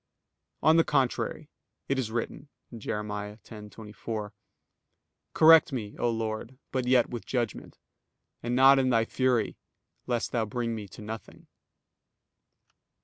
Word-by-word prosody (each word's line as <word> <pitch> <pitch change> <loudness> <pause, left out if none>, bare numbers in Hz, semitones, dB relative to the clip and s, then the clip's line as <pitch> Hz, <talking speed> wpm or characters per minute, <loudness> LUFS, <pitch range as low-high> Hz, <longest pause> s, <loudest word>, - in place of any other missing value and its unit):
On 160 +1 +6
the 165 - +6
contrary, 135 -5 0 0.4
It 135 -1 0
is 120 -4 -2
written 120 +5 -4 0.3
(Jer. 105 -1 -3
10:24): 105 0 -7 1.0
"Correct 160 -1 +7
me, 110 -6 -5
O 120 - +2
Lord, 115 +2 -3
but 130 -2 -1
yet 125 -2 +4
with 120 -2 -5
judgment; 120 -4 -3 0.6
and 120 +1 -2
not 135 +1 +7
in 130 -1 +2
Thy 115 -2 +3
fury, 125 -3 0 0.5
lest 120 -2 -1
Thou 115 -2 0
bring 115 +2 -2
me 105 -2 -6
to 100 - -12
nothing." 110 +1 -8
115 Hz, 125 wpm, -28 LUFS, 110-130 Hz, 1.0 s, Correct